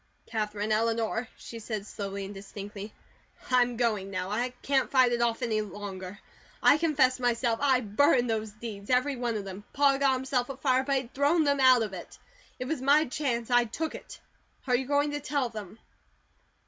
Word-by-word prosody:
"Katherine 210 Hz, -1 st, -3 dB
Eleanor," 225 Hz, +1 st, 0 dB
she 230 Hz, -, -9 dB
said 215 Hz, -2 st, -5 dB
slowly 200 Hz, -1 st, -5 dB
and 200 Hz, -, -8 dB
distinctly, 200 Hz, +1 st, -8 dB, 0.6 s
"I'm 245 Hz, -1 st, +3 dB
going 215 Hz, -5 st, 0 dB
now. 185 Hz, 0 st, -3 dB
I 240 Hz, +4 st, 0 dB
can't 270 Hz, -1 st, +1 dB
fight 255 Hz, -2 st, +4 dB
it 240 Hz, 0 st, 0 dB
off 235 Hz, +1 st, 0 dB
any 220 Hz, -3 st, 0 dB
longer. 200 Hz, -2 st, -7 dB, 0.5 s
I 295 Hz, -, +6 dB
confess 270 Hz, -6 st, +2 dB
myself. 240 Hz, -1 st, +1 dB
I 265 Hz, -3 st, +3 dB
burned 245 Hz, +3 st, +3 dB
those 220 Hz, -1 st, -1 dB
deeds. 210 Hz, -1 st, -8 dB
Every 255 Hz, +3 st, +2 dB
one 240 Hz, -2 st, -2 dB
of 200 Hz, -, -5 dB
them. 195 Hz, +1 st, -8 dB
Pa 280 Hz, -1 st, +4 dB
got 275 Hz, -1 st, +3 dB
himself 255 Hz, -1 st, -1 dB
afire, 260 Hz, -1 st, +1 dB
but 275 Hz, 0 st, 0 dB
he'd 260 Hz, -3 st, -3 dB
thrown 290 Hz, +4 st, +3 dB
THEM 285 Hz, -1 st, +2 dB
out 255 Hz, -3 st, +6 dB
of 210 Hz, -3 st, -5 dB
it. 180 Hz, -, -9 dB, 0.4 s
It 255 Hz, -, -4 dB
was 290 Hz, 0 st, -3 dB
my 290 Hz, +4 st, +4 dB
chance. 250 Hz, -4 st, -2 dB
I 245 Hz, 0 st, +5 dB
took 310 Hz, +8 st, -4 dB
it. -, -, -10 dB, 0.5 s
Are 250 Hz, -, +2 dB
you 255 Hz, +1 st, -1 dB
going 290 Hz, +1 st, +2 dB
to 290 Hz, -, -2 dB
tell 280 Hz, -3 st, -1 dB
them?" 215 Hz, -2 st, -8 dB
240 Hz, 185 wpm, -28 LUFS, 210-265 Hz, 0.6 s, I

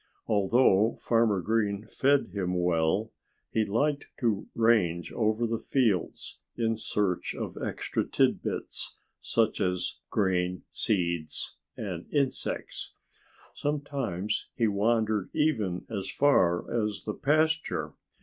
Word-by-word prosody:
Although 105 Hz, +1 st, +3 dB
Farmer 115 Hz, -5 st, +2 dB
Green 105 Hz, 0 st, 0 dB
fed 140 Hz, -3 st, +3 dB
him 90 Hz, -3 st, -1 dB
well, 90 Hz, +5 st, +1 dB, 0.4 s
he 110 Hz, -1 st, +2 dB
liked 140 Hz, +8 st, 0 dB
to 110 Hz, -5 st, 0 dB
range 100 Hz, -8 st, +2 dB
over 110 Hz, +1 st, +1 dB
the 115 Hz, -1 st, -1 dB
fields 115 Hz, -9 st, 0 dB, 0.2 s
in 115 Hz, -1 st, +1 dB
search 105 Hz, -4 st, -1 dB
of -, -, -5 dB
extra -, -, -1 dB
tidbits, -, -, -1 dB, 0.2 s
such -, -, +1 dB
as 90 Hz, -1 st, -1 dB
grain, 90 Hz, -2 st, 0 dB
seeds 85 Hz, -6 st, -1 dB, 0.2 s
and 90 Hz, -5 st, -5 dB
insects. 140 Hz, -3 st, -2 dB, 0.6 s
Sometimes 140 Hz, -10 st, -2 dB
he 115 Hz, -, +2 dB
wandered 110 Hz, 0 st, +1 dB
even 110 Hz, -, 0 dB
as 100 Hz, -4 st, -4 dB
far 90 Hz, -12 st, +3 dB, 0.2 s
as 105 Hz, -3 st, -3 dB
the 105 Hz, -, -3 dB
pasture. 155 Hz, +4 st, +1 dB
105 Hz, 110 wpm, -29 LUFS, 90-120 Hz, 0.6 s, Although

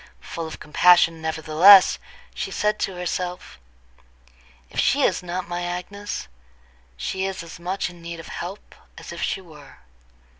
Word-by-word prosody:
Full 165 Hz, -1 st, -6 dB
of 160 Hz, -, -9 dB
compassion, 165 Hz, +1 st, +4 dB
nevertheless, 160 Hz, +5 st, +6 dB, 0.3 s
she -, -, -4 dB
said 210 Hz, 0 st, 0 dB
to 190 Hz, -, -2 dB
herself: 180 Hz, -, -4 dB, 1.1 s
"If -, -, -4 dB
she -, -, +3 dB
is -, -, +2 dB
not 180 Hz, +1 st, -4 dB
my 175 Hz, 0 st, -3 dB
Agnes, 180 Hz, -, -5 dB, 0.7 s
she 190 Hz, -, -2 dB
is 190 Hz, -3 st, -5 dB
as 165 Hz, 0 st, -11 dB
much 185 Hz, +3 st, -2 dB
in 175 Hz, -1 st, -12 dB
need 170 Hz, 0 st, -7 dB
of 165 Hz, -, -10 dB
help 185 Hz, +4 st, -7 dB, 0.2 s
as -, -, -9 dB
if -, -, -7 dB
she 195 Hz, -, -1 dB
were. 155 Hz, -5 st, -15 dB
175 Hz, 150 wpm, -23 LUFS, 165-190 Hz, 1.1 s, nevertheless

